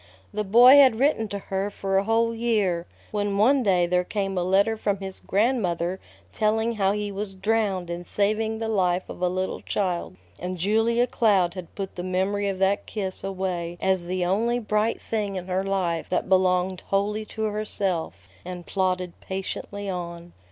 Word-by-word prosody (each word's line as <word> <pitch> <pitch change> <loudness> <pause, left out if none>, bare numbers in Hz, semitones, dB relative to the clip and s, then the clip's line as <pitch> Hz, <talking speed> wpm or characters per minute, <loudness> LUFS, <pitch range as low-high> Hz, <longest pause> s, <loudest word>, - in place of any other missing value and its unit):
The 210 - -1
boy 240 +7 +8
had 265 -5 +7
written 255 -4 +2
to 200 - -4
her 195 0 -3
for 195 -1 -3
a - - -1
whole 230 +1 +2
year, 210 -7 0 0.2
when 205 -1 -1
one 260 +7 +4
day 185 -6 +3
there 180 +1 +1
came 195 0 -2
a 180 - 0
letter 195 +4 +3
from 205 -2 -1
his 190 -1 -5
grandmother 190 -5 0 0.3
telling 220 +1 +1
how 200 -4 +1
he 210 0 -3
was 200 0 -5
drowned 195 -2 0
in 170 +1 -4
saving 215 +4 0
the 225 0 -3
life 185 -4 +1
of - - -8
a 180 - +2
little 185 +1 -2
child; 180 - -2 0.2
and 180 +1 -4
Julia 225 +6 +2
Cloud 200 -8 +2
had 180 -2 -9
put 195 -1 -5
the 175 - -6
memory 190 +2 0
of 195 - -3
that 195 +2 +1
kiss 190 -3 -4
away 185 -3 -3
as 190 -2 +1
the 180 0 -1
only 225 +6 +1
bright 215 -1 0
thing 210 -3 -3
in 180 -1 -4
her 185 +1 -1
life 185 -4 -1
that 180 - 0
belonged 185 -1 +2
wholly 205 +2 0
to 220 +1 -5
herself, 195 - -2 0.2
and 180 -1 -7
plodded 185 -2 -1
patiently 195 +1 -5
on. 170 -2 -5
195 Hz, 180 wpm, -25 LUFS, 185-215 Hz, 0.3 s, boy